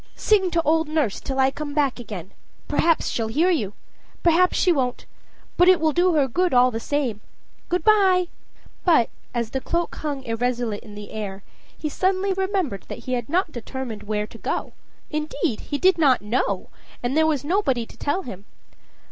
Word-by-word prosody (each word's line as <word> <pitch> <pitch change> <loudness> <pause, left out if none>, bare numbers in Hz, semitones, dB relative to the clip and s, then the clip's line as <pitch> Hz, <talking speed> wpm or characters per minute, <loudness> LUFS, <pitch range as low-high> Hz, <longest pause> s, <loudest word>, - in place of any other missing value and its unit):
Sing 395 -4 +3
to 335 -1 +1
old 320 0 +2
nurse 305 -10 0
till 265 - -4
I 265 0 +4
come 290 +1 -6
back 280 -4 +1
again. 200 -6 -7 0.4
Perhaps 330 -1 +2
she'll 225 -2 -1
hear 320 +11 +2
you 210 - -1 0.5
perhaps 350 +2 +4
she 365 - +4
won't 255 -6 -1 0.5
but 355 +1 +6
it 370 - +6
will 315 -1 +2
do 350 +2 +3
her 285 -3 +3
good 350 +4 +1
all 250 +1 +6
the 225 - -3
same. 250 -5 -2 0.5
Good 360 -1 0
by!" 380 -4 +4 0.5
But, 320 -10 +4 0.2
as 235 -2 -1
the 265 - -2
cloak 340 +4 -1
hung 285 -3 -3
irresolute 235 -2 -1
in 210 -3 -12
air, 205 -2 -6 0.3
he 310 - -3
suddenly 380 +5 +1
remembered 375 - -1
that 235 - -8
he 255 - -2
had 240 -1 -2
not 345 +1 +1
determined 240 -3 -6
where 210 0 -2
to 225 +2 -14
go - - -3 0.4
indeed, 305 -4 -2
he 285 - 0
did 370 +2 +4
not 265 -8 +4
know, 225 +5 -1 0.3
and 245 +3 -1
there 315 0 +4
was 290 -3 0
nobody 290 - +1
to - - -15
tell 300 +7 -1
him. 200 -6 -9
285 Hz, 180 wpm, -23 LUFS, 235-345 Hz, 0.5 s, but